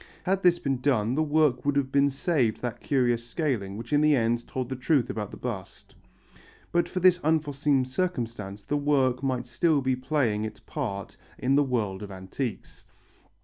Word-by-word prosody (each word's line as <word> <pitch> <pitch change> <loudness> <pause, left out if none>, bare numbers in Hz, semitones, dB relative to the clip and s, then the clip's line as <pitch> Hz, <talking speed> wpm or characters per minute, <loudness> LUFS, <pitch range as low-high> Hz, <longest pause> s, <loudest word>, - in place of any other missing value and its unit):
Had 190 +1 +1
this 180 -2 +5
been 135 -6 -2
done 125 -5 +2
the 155 - +1
work 150 -4 +2
would 145 0 +1
have 135 -2 0
been 140 0 +4
saved 135 -5 0
that 120 -1 -3
curious 120 -4 +1
scaling 120 - -2
which 120 +5 -6
in 145 - +4
the 150 -1 +5
end 120 -1 0
told 130 -2 -3
the 130 - -4
truth 130 0 +1
about 105 -2 -4
the - - -10
bust. 110 -7 -7 0.8
But 175 0 +1
for 185 - -2
this 180 -1 +5
unforeseen 145 -4 +1
circumstance 115 - -3
the 145 - 0
work 135 -4 +2
might 130 -3 -1
still 155 +4 +2
be 130 -1 +1
playing 125 -5 0
its 110 0 -6
part 105 - -5 0.2
in 130 +2 +1
the 145 - +5
world 110 -8 -1
of 105 - -7
antiques. 95 +6 -6
130 Hz, 185 wpm, -27 LUFS, 115-145 Hz, 0.8 s, this